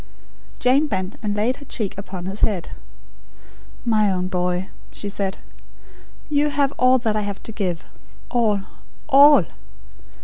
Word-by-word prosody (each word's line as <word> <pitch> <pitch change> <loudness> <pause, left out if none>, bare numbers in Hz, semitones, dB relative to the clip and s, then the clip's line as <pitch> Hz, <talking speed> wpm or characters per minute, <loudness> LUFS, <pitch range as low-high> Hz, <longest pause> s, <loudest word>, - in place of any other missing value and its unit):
Jane 270 +5 +3
bent, 190 -4 -3
and 205 -2 -2
laid 225 +5 0
her 285 - -12
cheek 215 -8 -3
upon 190 -2 -7
his 195 +2 -4
head. 195 -6 0 1.2
"My 215 -3 +3
own 185 0 -1
boy," 180 0 -1 0.2
she 205 - -5
said, 195 -1 -2 0.9
"you 295 -1 +2
have 280 -1 +1
all 255 +1 +5
I 215 -1 +1
have 200 -1 -5
to - - -7
give 185 -6 -2 0.5
all, 220 -5 +2 0.5
ALL. 280 - +7
210 Hz, 135 wpm, -22 LUFS, 190-255 Hz, 1.2 s, ALL